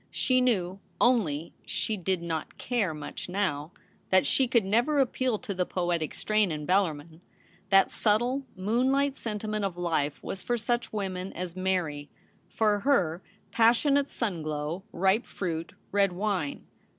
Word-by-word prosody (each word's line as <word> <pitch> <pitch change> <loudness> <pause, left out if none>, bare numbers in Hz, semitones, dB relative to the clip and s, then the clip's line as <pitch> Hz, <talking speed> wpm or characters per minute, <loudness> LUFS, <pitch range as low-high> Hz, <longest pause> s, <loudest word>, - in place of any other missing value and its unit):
She 255 -1 +2
knew 195 -7 +1
— - - -36
only 170 - 0
she 220 - -2
did 185 -2 -1
not 165 -2 -4
care 230 -8 0
much 150 +3 -7
now 180 -5 -1 0.2
— - - -35
that 185 -1 +4
she 265 - +3
could 235 -4 +3
never 240 +9 +2
appeal 255 -3 +1
to 200 - -5
the 180 -1 0
poetic 175 -3 -1
strain 215 -3 +1
in 150 -1 -4
Bellarmin. 165 -3 0 0.5
That 195 -1 +5
subtle, 240 +5 +1
moonlight 260 +8 +1
sentiment 215 -2 -3
of 190 -3 -2
life 160 -5 0
was 195 - -5
for 240 - 0
such 240 +1 -1
women 190 -3 -3
as 180 -1 -5
Mary. 180 -6 -1 0.4
For 210 +1 +2
her, 190 - +2 0.3
pas 230 +1 +5
sionate 285 0 +2
sun 200 -9 -2
glow, 155 +3 -3
ripe 190 +6 +2
fruit, 170 -3 -4 0.2
red 200 -2 +3
wine. 185 -6 -2
195 Hz, 155 wpm, -28 LUFS, 170-230 Hz, 0.5 s, That